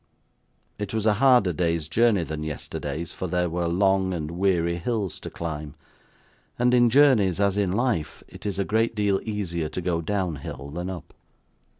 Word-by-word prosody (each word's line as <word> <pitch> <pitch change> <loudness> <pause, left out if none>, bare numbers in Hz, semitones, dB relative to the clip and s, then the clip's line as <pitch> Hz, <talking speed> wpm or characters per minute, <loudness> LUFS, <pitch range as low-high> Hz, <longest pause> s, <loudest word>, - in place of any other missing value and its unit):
It 105 +1 -4
was 110 -1 -1
a 110 - +5
harder 125 -9 +5
day's 85 -2 0
journey 110 0 +3
than 80 -1 -5
yesterday's, 80 +2 -5
for 95 - -4
there 90 0 0
were 85 0 -1
long 95 +1 +2
and 75 -2 -4
weary 85 -2 +1
hills 105 -1 -2
to - - -7
climb; 75 -3 -5 0.8
and 125 +1 +3
in 120 -1 +5
journeys, 115 - +4
as 100 -1 +2
in 100 -3 +1
life, 105 -7 -1
it - - -8
is 100 - -3
a 100 - 0
great 110 +3 +1
deal 100 -2 +1
easier 90 -7 -3
to 90 - -4
go 85 -2 -1
down 90 -2 -1
hill 70 +1 -8
than 90 +4 -4
up. 90 -4 -8
95 Hz, 180 wpm, -25 LUFS, 85-105 Hz, 0.8 s, a